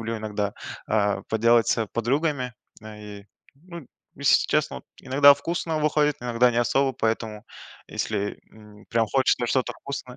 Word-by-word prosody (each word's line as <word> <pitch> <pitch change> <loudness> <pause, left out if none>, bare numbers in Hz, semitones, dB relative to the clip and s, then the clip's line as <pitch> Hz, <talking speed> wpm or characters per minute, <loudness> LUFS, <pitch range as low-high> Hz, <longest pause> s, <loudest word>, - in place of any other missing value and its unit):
люблю 115 0 -3
иногда, 105 -1 -3 0.3
а, 105 -2 0
поделать 115 +1 +3
с 115 -2 +1
подругами. 130 +2 -1 0.3
Э, 110 -1 -10 0.2
и, 100 - -21 0.3
ну, 170 -1 -12 0.3
если - - +3
честно - - 0
вот, - - -10 0.2
иногда 140 +2 +6
вкусно 165 +1 -3
выходит, 150 -1 +1
иногда 120 0 +2
не 115 - 0
особо. 135 +3 +1
Поэтому 110 -2 -3 0.4
если, 105 -1 -3
м, 105 -1 -16
прям 115 -1 +1
хочется 130 -2 +2
что-то 130 +1 0
вкусное 130 -3 -8
120 Hz, 150 wpm, -24 LUFS, 110-140 Hz, 0.4 s, иногда